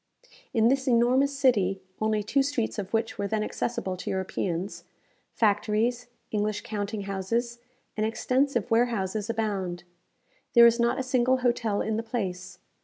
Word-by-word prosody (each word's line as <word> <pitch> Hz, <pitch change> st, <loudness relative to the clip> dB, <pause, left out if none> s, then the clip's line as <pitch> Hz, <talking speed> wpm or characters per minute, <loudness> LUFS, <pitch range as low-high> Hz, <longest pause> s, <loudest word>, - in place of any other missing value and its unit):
In 225 Hz, -2 st, +3 dB
this 270 Hz, +2 st, +1 dB
enormous 255 Hz, +4 st, +3 dB
city 200 Hz, -9 st, +2 dB, 0.2 s
(only 215 Hz, -1 st, +1 dB
two 275 Hz, +7 st, +2 dB
streets 270 Hz, -6 st, -1 dB
of 195 Hz, -1 st, -5 dB
which 225 Hz, 0 st, -1 dB
were 200 Hz, -, 0 dB
then 215 Hz, +1 st, -1 dB
accessible 195 Hz, -4 st, -3 dB
to -, -, -5 dB
Europeans), 190 Hz, -1 st, -3 dB, 0.5 s
factories, 220 Hz, +3 st, +1 dB, 0.2 s
English 210 Hz, 0 st, -1 dB
counting 205 Hz, 0 st, -4 dB
houses, 230 Hz, +5 st, -2 dB, 0.4 s
and 215 Hz, -, -1 dB
extensive 245 Hz, +1 st, 0 dB
warehouses 220 Hz, -3 st, +1 dB
abound. 195 Hz, -6 st, -2 dB, 0.7 s
There 235 Hz, 0 st, +9 dB
is 235 Hz, 0 st, +5 dB
not 235 Hz, 0 st, +2 dB
a -, -, -1 dB
single 255 Hz, 0 st, +2 dB
hotel 230 Hz, -4 st, +1 dB
in 220 Hz, 0 st, -1 dB
the -, -, 0 dB
place. 185 Hz, -6 st, -4 dB
220 Hz, 145 wpm, -27 LUFS, 200-240 Hz, 0.7 s, There